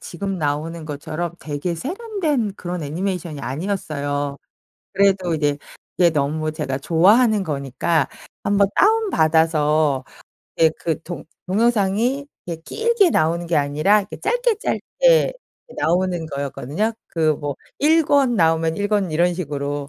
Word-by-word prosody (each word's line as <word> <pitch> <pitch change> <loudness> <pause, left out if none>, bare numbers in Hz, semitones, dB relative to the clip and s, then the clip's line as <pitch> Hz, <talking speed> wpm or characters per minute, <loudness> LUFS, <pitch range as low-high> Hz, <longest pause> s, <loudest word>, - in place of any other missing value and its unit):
지금 195 +2 -5
나오는 155 +2 -2
것처럼 155 +3 -4
되게 155 +3 -3
세련된 310 - -2
그런 175 -2 -5
애니메이션이 170 0 -3
아니었어요. 145 -3 -3 0.6
그래도 190 -3 +2
이제 145 -1 0 0.4
이게 175 -2 +5
너무 155 +1 -1
제가 150 -4 -3
좋아하는 200 - +4
거니까 140 +1 0 0.4
한번 200 -1 +3
다운 440 +1 +3
받아서 155 - +2 0.5
이렇게 160 -1 +4
그 165 -2 -2
동 175 0 -7 0.2
동영상이 230 +5 +1 0.2
이렇게 165 -2 -5
길게 450 - +2
나오는 170 +2 +1
게 165 - +1
아니라 150 +9 +3
이렇게 195 - -8
짧게 485 +1 +1
짧게 - - +2 0.4
이 - - -12
나오는 175 0 0
거였거든요. 145 - -3
그 160 -4 +1
뭐 145 -1 -3 0.2
1 320 +2 +4
권 275 -5 +3
나오면 165 -1 +2
1 205 0 -1
권 205 -5 +1
이런 175 +3 +2
식으로 145 -4 -4
170 Hz, 300 characters per minute, -21 LUFS, 150-205 Hz, 0.6 s, 이게